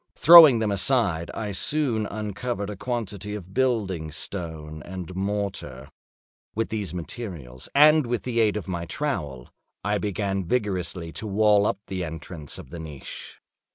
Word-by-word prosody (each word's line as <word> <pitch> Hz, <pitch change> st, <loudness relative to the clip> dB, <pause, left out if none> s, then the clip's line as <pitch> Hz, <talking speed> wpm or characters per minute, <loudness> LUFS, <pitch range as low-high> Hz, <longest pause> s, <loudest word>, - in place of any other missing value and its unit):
Throwing 160 Hz, -6 st, +10 dB
them 110 Hz, -2 st, 0 dB
aside, 100 Hz, -6 st, +1 dB
I 105 Hz, -2 st, -3 dB
soon 115 Hz, 0 st, 0 dB
uncovered 105 Hz, 0 st, -4 dB
a -, -, -6 dB
quantity 105 Hz, -3 st, -4 dB
of 95 Hz, -2 st, -9 dB
building 100 Hz, -10 st, 0 dB
stone 80 Hz, -2 st, -6 dB
and 90 Hz, +1 st, -7 dB
mortar. 95 Hz, -9 st, -4 dB, 0.6 s
With 115 Hz, +1 st, -1 dB
these 105 Hz, -6 st, -3 dB
materials 85 Hz, -, -7 dB
and 150 Hz, -1 st, +6 dB
with 120 Hz, -1 st, -2 dB
the 120 Hz, -2 st, -1 dB
aid 105 Hz, -2 st, +3 dB
of 100 Hz, -, -6 dB
my 85 Hz, -2 st, -3 dB
trowel, 75 Hz, -, -3 dB, 0.3 s
I 105 Hz, 0 st, 0 dB
began 100 Hz, -1 st, -2 dB
vigorously 90 Hz, -5 st, -2 dB
to 110 Hz, +6 st, -6 dB
wall 105 Hz, 0 st, +4 dB
up -, -, 0 dB
the 95 Hz, -2 st, -4 dB
entrance 80 Hz, -2 st, -7 dB
of -, -, -11 dB
the 85 Hz, -, -7 dB
niche. 75 Hz, -4 st, -9 dB
100 Hz, 150 wpm, -25 LUFS, 85-110 Hz, 0.6 s, Throwing